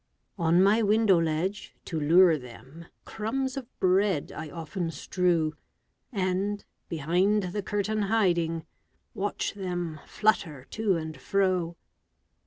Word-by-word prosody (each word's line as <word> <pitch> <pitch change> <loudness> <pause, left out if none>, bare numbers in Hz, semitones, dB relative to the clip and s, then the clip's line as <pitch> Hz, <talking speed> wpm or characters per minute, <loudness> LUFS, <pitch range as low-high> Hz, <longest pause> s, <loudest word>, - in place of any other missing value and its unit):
On 170 +2 +4
my 210 +4 +4
window 210 -3 +4
ledge, 165 +6 -2
to 165 - -3
lure 165 +3 +6
them, 135 +5 -11 0.2
Crumbs 255 +5 -2
of 265 -3 -5
bread 185 -3 +2
I 155 0 -6
often 165 +2 -4
strew, 165 0 0 0.6
And, 195 0 -1 0.2
behind 180 +7 +1
the 205 - -1
curtain 205 +2 -1
hiding, 175 -6 +1 0.5
Watch 205 +1 -2
them 175 -5 -4
flutter 165 -11 0
to 215 -4 +1
and 160 -1 -5
fro. 185 -3 0
185 Hz, 115 wpm, -28 LUFS, 165-205 Hz, 0.6 s, lure